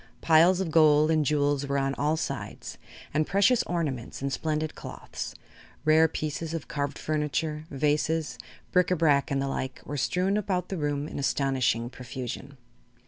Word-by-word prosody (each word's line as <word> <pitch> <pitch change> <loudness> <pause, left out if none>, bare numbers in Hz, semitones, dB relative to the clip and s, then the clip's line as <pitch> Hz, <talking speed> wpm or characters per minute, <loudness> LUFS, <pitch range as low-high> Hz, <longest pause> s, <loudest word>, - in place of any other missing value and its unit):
Piles 170 +3 +5
of 185 -4 -2
gold 155 -1 +5
and 155 -1 +3
jewels 145 -1 +1
were 140 0 0
on 135 0 0
all 150 +3 0
sides - - -5 0.3
and 155 0 +1
precious 200 +6 +4
ornaments 145 -9 -3
and 140 0 -2
splendid 155 -1 -1
cloths, - - -7 0.5
rare 160 +1 +6
pieces 155 +1 -4
of 160 - -5
carved 145 -1 -3
furniture, 150 0 -2
vases, 150 +3 0 0.3
bric 180 -1 +3
a 180 - +3
brac 150 -2 +3
and 140 -1 0
the 135 - -1
like, 130 -1 -3
were 145 - -4
strewn 185 +8 +1
about 185 -3 -1
the 190 - -3
room 145 -1 -1
in - - -6
astonishing 130 -4 +1
profusion. 130 +2 -7
150 Hz, 160 wpm, -27 LUFS, 140-160 Hz, 0.5 s, rare